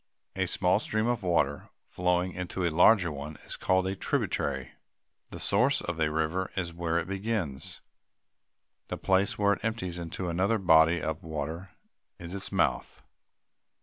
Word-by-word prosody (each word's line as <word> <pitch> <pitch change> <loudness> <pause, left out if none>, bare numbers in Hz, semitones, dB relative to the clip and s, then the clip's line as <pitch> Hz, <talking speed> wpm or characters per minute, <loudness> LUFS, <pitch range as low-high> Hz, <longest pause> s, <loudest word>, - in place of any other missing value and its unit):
A - - 0
small - - +2
stream 110 +1 -1
of 120 -2 0
water 90 -3 0
flowing 90 0 0
into 90 0 -3
a 85 - +1
larger 90 0 +5
one 75 +1 -6
is - - -6
called 95 0 +1
a 95 +1 -1
tributary. 65 -7 -1 0.6
The - - -8
source 125 +8 +2
of 85 -1 -4
a 75 -1 +2
river 80 +4 -1
is 85 -2 -2
where 85 -1 -1
it 85 - 0
begins. 95 -7 -3 1.1
The - - -4
place 95 +1 +1
where 100 0 +3
it 100 - -6
empties 100 -6 -2
into 85 +2 -4
another 95 +6 +1
body 85 -3 +5
of 80 0 -3
water 80 +3 -5 0.4
is 85 +1 -8
its 100 -1 -6
mouth. - - 0
90 Hz, 155 wpm, -29 LUFS, 80-95 Hz, 1.1 s, larger